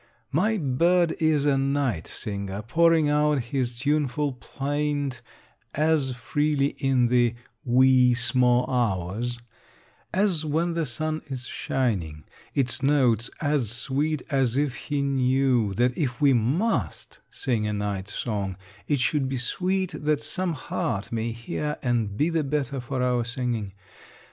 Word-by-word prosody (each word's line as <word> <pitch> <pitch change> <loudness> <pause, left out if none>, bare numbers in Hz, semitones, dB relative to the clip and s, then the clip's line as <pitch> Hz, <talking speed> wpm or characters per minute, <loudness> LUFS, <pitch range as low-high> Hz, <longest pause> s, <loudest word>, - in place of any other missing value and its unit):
My 210 +10 +2
bird 170 +3 +2
is 155 -3 +2
a 140 -2 +3
night 135 - 0
singer, 100 0 -4
pouring 165 +5 +3
out 150 0 +2
his 125 -1 -2
tuneful 145 +1 0
plaint 145 +2 -3 0.5
as 150 -4 +1
freely 145 +3 0
in 130 -2 +2
the 120 -1 +3 0.3
"wee, 125 0 +5
sma' 125 0 +3
hours," 115 -1 -1 0.7
as 185 -4 +1
when 160 +3 0
the 165 -2 -1
sun 155 +5 -2
is 130 -3 -6
shining; 95 - -2 0.3
its 130 -1 +1
notes 130 -5 +2
as 145 -7 +1
sweet 135 +6 -1
as 135 -3 +1
if 145 -3 +1
he 140 +1 -3
knew 130 -4 +2
that 125 +3 +2
if 130 -6 -2
we 140 -2 +5
must 130 - -1
sing 115 -5 -1
a 105 - -1
night 100 -2 -3
song 100 -4 -3 0.3
it 145 -2 +1
should 135 +1 +1
be 135 - -2
sweet 185 +8 -1
that 150 -1 +2
some 180 +3 -1
heart 115 -7 -3
may 115 0 -1
hear 120 +6 -4
and 115 -5 0
be 155 +7 +2
the 165 -2 +1
better 140 -2 -2
for 125 +1 -3
our 125 -1 +1
singing. 120 -4 -2
130 Hz, 140 wpm, -25 LUFS, 120-150 Hz, 0.7 s, wee